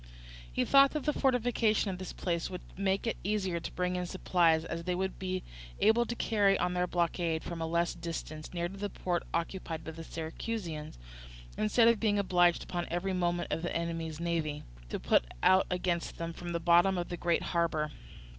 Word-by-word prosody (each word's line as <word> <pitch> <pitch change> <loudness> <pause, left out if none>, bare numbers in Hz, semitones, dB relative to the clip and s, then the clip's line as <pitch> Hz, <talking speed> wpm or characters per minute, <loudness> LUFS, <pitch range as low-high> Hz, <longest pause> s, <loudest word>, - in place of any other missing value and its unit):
He - - 0
thought 275 0 +6
that 305 -3 -2
the 300 - +1
fortification 235 -6 +2
of 180 - -6
this 185 - -5
place 170 -2 -2
would 180 -1 -6
make 195 +2 0
it 230 - -1
easier 190 -4 0
to - - -6
bring 180 0 -1
in 180 0 -2
supplies, 170 -3 +2
as 170 0 -4
they 180 -1 0
would 190 +1 -2
be 185 0 -2 0.4
able 230 +2 +4
to 240 - -3
carry 205 -4 +3
on 180 0 0
their 180 0 +1
blockade 170 -2 0
from 170 -1 -5
a 160 - -1
less 170 +1 +1
distance, 155 -2 -6
near 175 -1 -1
to 190 - -9
the 205 +1 -3
port 175 -3 -1
occupied 170 -1 -3
by 160 - -6
the 165 +1 -8
Syracusans; 165 - -5 0.6
instead 220 +2 +4
of 235 -2 +4
being 210 -2 +2
obliged, 175 -3 +3
upon 175 -1 -3
every 180 +3 -1
movement 175 -1 0
of - - -1
the 175 - -3
enemy's 165 -2 -3
navy, 165 -3 -1 0.3
to - - -3
put - - +3 0.2
out 190 0 +5
against 175 -1 -1
them 165 0 -4
from 175 +1 -7
the 170 - -1
bottom 175 +3 +4
of 175 - -3
the 175 - -3
great 170 -1 +1
harbour. 160 -3 +1
175 Hz, 200 wpm, -31 LUFS, 170-195 Hz, 0.6 s, thought